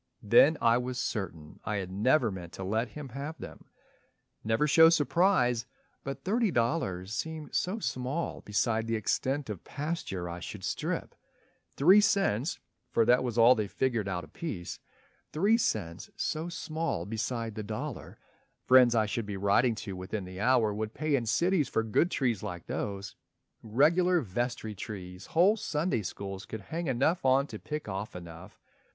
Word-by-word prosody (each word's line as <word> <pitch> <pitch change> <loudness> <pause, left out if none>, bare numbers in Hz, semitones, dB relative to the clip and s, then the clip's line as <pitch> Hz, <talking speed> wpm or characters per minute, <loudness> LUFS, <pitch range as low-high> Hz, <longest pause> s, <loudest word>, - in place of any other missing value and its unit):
Then 130 +9 +6
I 115 +1 +4
was 125 0 -4
certain 85 -11 -4
I 105 - -2
had 95 -2 -3
never 120 +5 +2
meant 90 -3 -8
To 95 - -6
let 110 +5 0
him 150 -3 -8
have 140 +6 -6
them. - - -10 0.8
Never 110 +6 +2
show 160 +3 +7
surprise! 150 - +2 0.4
But 135 0 -6
thirty 225 +3 +1
dollars 115 - -1
seemed 160 +3 -5
so 185 +5 0
small 140 - -3
beside 110 +2 0
The 115 - 0
extent 130 +6 -1
of 105 -6 -6
pasture 145 - -4
I 85 +1 -6
should - - -8
strip, - - -3 0.6
three 185 +9 +7
cents 175 - +1 0.3
(For 115 -2 +2
that 125 +2 +4
was 120 -2 -3
all 120 +2 +8
they 110 -4 -2
figured 110 +1 -1
out 90 -2 -2
apiece), 150 - -6 0.5
Three 200 +8 +3
cents 95 - -2
so 160 +3 -2
small 160 - -3
beside 115 +2 -3
the 110 - -5
dollar 110 +1 -6 0.5
friends 125 -2 +6
I 110 -1 +3
should 105 0 -3
be 100 -1 -4
writing 100 +5 +3
to 95 - -5
within 95 +2 -5
the 95 +1 -9
hour 115 -1 +3
Would 110 +1 -4
pay 155 0 -1
in 120 -4 -1
cities 170 - +2
for 115 - 0
good 110 +10 +2
trees 120 - 0
like 90 -5 -6
those, 100 -1 -4 0.5
Regular 165 +11 +3
vestry 115 0 -3
trees 95 -2 -8
whole 190 +7 +4
Sunday 150 - -1
Schools 95 0 -6
Could 110 - -6
hang 165 - -4
enough 140 +7 +1
on 135 +1 +4
to - - -8
pick 150 -4 -5
off 100 +1 -5
enough. 85 +2 -10
115 Hz, 165 wpm, -30 LUFS, 100-150 Hz, 0.8 s, all